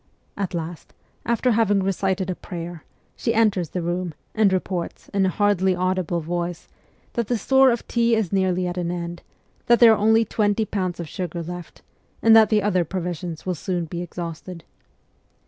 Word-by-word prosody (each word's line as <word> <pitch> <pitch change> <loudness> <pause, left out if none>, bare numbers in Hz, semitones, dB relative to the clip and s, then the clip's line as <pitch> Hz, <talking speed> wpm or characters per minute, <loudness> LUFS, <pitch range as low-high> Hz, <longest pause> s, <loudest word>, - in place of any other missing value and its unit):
At 195 -3 -3
last, 165 0 -6 0.3
after 235 +2 +2
having 205 -3 +2
recited 190 0 0
a - - -3
prayer, 170 -3 -7 0.3
she 230 - -1
enters 200 -7 +2
the 180 - -3
room, 175 -1 -2 0.2
and 215 -3 +3
reports, 185 -2 -3
in 195 -1 +2
a - - +2
hardly 190 -1 +2
audible 180 -2 -1
voice, 175 +1 -4 0.5
that 235 -3 -1
the 240 - +1
store 265 +5 +5
of 235 -2 -1
tea 235 -1 +2
is 215 -6 -1
nearly 185 -1 +1
at 180 0 -3
an 170 -1 -2
end, 175 0 -4 0.5
that 240 0 +5
there 235 -2 +9
are - - +1
only 220 +2 +4
twenty 210 0 +1
pounds 185 -4 -3
of 170 - -4
sugar 170 0 -4
left, 175 +1 -9 0.4
and 225 0 +6
that 220 -2 +7
the 210 -2 +2
other 185 -4 +2
provisions 175 -1 -5
will 185 - 0
soon 175 +1 -3
be 170 +2 -5
exhausted. 170 0 -7
185 Hz, 180 wpm, -23 LUFS, 175-210 Hz, 0.5 s, there